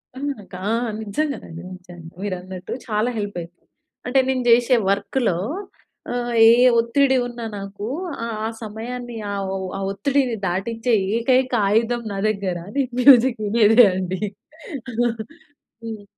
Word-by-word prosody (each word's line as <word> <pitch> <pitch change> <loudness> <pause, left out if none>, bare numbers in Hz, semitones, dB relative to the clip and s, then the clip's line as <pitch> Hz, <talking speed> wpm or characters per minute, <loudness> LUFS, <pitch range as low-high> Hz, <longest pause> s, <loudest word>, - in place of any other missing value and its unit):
హ్మ్, 285 +2 -2 0.2
కా 180 - -6 0.4
నిజంగానండి! 210 - -3
నిజంగా! 175 -2 -12
మీరు 200 -2 -2
అన్నట్టు 185 0 -9 0.2
చాలా 215 +2 0
హెల్ప్ 205 -3 -4
అయితది. 170 +1 -13 0.4
అంటే 260 +2 +3
నేను 255 -1 0
జేషే 240 +2 +5
వర్క్‌లొ 200 0 0 0.8
ఆహ్, 245 0 -2
ఏ - - +9 0.3
ఒత్తిడి 265 +3 +3
ఉన్న 240 -1 -8 0.2
నాకు 200 +1 -6 0.6
ఆ - - 0
సమయాన్ని 235 +2 -6 0.2
ఆ - - -2 0.2
ఒ - - -1 0.3
ఒత్తిడిని 255 +4 0
దాటించే 225 +6 -1 0.2
ఏకైక 255 +2 +2
ఆయుధం 230 +3 +1
నా - - -4
దగ్గర 195 -4 -2 0.2
నేను 265 -2 0
మ్యూజిక్ 250 -2 +6
వినేదే 225 +2 +6
అండి. 185 +1 -3 1.6
హ్మ్. 220 -2 -6
225 Hz, 120 wpm, -22 LUFS, 195-250 Hz, 1.6 s, ఏ